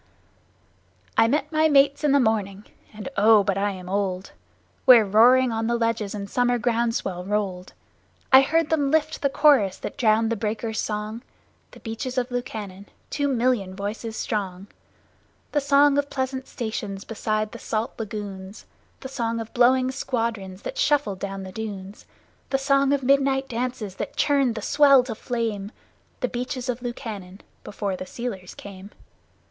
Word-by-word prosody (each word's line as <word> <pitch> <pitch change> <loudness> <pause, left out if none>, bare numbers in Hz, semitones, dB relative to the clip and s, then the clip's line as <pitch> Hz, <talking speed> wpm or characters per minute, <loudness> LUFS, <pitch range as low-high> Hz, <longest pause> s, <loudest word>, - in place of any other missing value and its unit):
I 225 - +5
met 295 +8 0
my 315 0 +3
mates 280 0 +4
in 295 - +3
the 280 - +5
morning 210 -4 0 0.3
(and, 210 +2 -8
oh, 210 0 +6
but 195 -1 0
I 200 +1 0
am 185 -2 -7
old!) 190 -1 -2 0.5
Where 240 -4 +8
roaring 240 +5 +5
on 225 0 -1
the 235 0 +1
ledges 230 -3 -1
the 205 -1 -4
summer 245 +3 +1
ground 235 -1 0
swell 180 -5 -3
rolled; 190 -2 -3 0.6
I 265 - +10
heard 325 +3 +1
them 290 -3 +2
lift 310 +1 0
the 280 - +2
chorus 270 -10 +4
that - - -7
drowned 225 -1 +3
the - - +1
breakers' 220 +1 -3
song 215 +2 -3 0.5
The - - -16
Beaches 240 +3 -5
of 250 0 -1
Lukannon 205 -5 -5 0.2
two 285 -1 0
million 240 -7 0
voices 215 +3 -5
strong. 195 -3 -3 0.9
The 290 - +1
song 285 0 +4
of 285 0 -2
pleasant 260 0 -3
stations 210 -4 -5
beside 215 -1 -2
the 235 - -9
salt 225 +3 -2
lagoons, 205 -2 -7 0.4
The 265 - -6
song 230 -3 -2
of 225 -1 -7
blowing 255 +1 +4
squadrons 225 -7 -3
that - - -5
shuffled 290 - +1
down 195 0 -5
the 190 - -8
dunes, 200 -1 -7 0.4
The 270 - +2
song 275 0 +2
of 280 -2 +1
midnight 270 0 +2
dances 235 -5 -4
that - - -5
churned 275 -5 +2
the 215 - -5
sea 280 -3 +5
to 245 - -4
flame 220 -3 -3 0.5
The 250 - +1
Beaches 250 +1 -4
of 245 0 -2
Lukannon 215 -6 -7 0.2
before 200 -2 -3
the 185 - -7
sealers 205 -7 -6
came! 200 -1 -10
230 Hz, 165 wpm, -24 LUFS, 205-260 Hz, 0.9 s, I